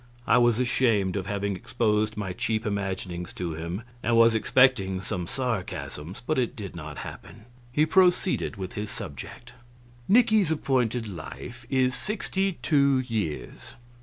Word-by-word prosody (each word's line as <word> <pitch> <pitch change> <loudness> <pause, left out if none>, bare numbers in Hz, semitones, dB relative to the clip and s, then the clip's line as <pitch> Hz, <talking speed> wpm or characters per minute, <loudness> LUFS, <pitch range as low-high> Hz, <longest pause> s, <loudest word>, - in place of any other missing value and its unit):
I - - +5
was 120 -1 +4
ashamed 115 -6 +2
of 95 -2 -3
having 100 -1 -1
exposed 110 +1 0
my 95 -3 -3
cheap 110 +4 -1
imaginings 95 -3 -3
to 85 -3 -3
him, 85 +7 -5 0.2
and 115 -1 +2
was 115 0 +7
expecting 110 -5 +3
some 90 -2 -4
sarcasms, 100 - -4
but 155 -1 +1
it 125 +1 -1
did 100 -6 -7
not 75 -3 -7
happen. 110 - -10 0.3
He 150 +5 +3
proceeded 180 -3 +3
with 95 -2 -6
his 105 +1 -4
subject: 80 - -8 0.5
"Nicky's 215 -4 +5
appointed 125 -6 0
life 120 +7 -8
is 130 -1 +2
sixty 195 - -1
two 140 -3 +4
years." 105 - -4
110 Hz, 140 wpm, -27 LUFS, 95-130 Hz, 0.5 s, was